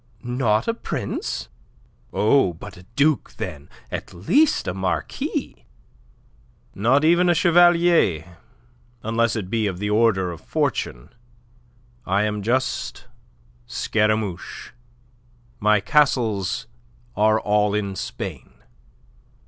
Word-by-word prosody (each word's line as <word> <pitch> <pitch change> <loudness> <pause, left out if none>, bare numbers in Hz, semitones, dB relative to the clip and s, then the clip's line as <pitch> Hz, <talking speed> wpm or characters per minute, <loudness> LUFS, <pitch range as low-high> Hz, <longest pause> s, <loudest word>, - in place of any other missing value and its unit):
"Not 120 -3 0
a 230 - +2
prince? 235 - -4 0.6
Oh, 110 -4 +3
but 95 +4 -11
a 90 +1 -16
duke, 145 -3 +1
then - - -6 0.2
at - - -6
least 275 - +2
a - - -1
marquis." 95 -1 -3 1.1
"Not 130 +9 +2
even 175 +2 +4
a 175 - +4
chevalier, 170 - +3 0.6
unless 115 +1 +1
it 100 -4 -4
be 110 -2 +1
of 95 -3 -3
the 105 +2 -2
order 105 -5 +2
of 85 - -9
fortune. - - -2 0.9
I 100 0 +1
am 105 -1 -2
just 130 +5 -1 0.6
Scaramouche. 105 - -1 0.9
My 105 0 +4
castles 120 -3 +1 0.5
are 110 +1 +3
all 105 -1 +1
in 100 -2 -2
Spain." - - -6
110 Hz, 105 wpm, -22 LUFS, 95-130 Hz, 1.1 s, even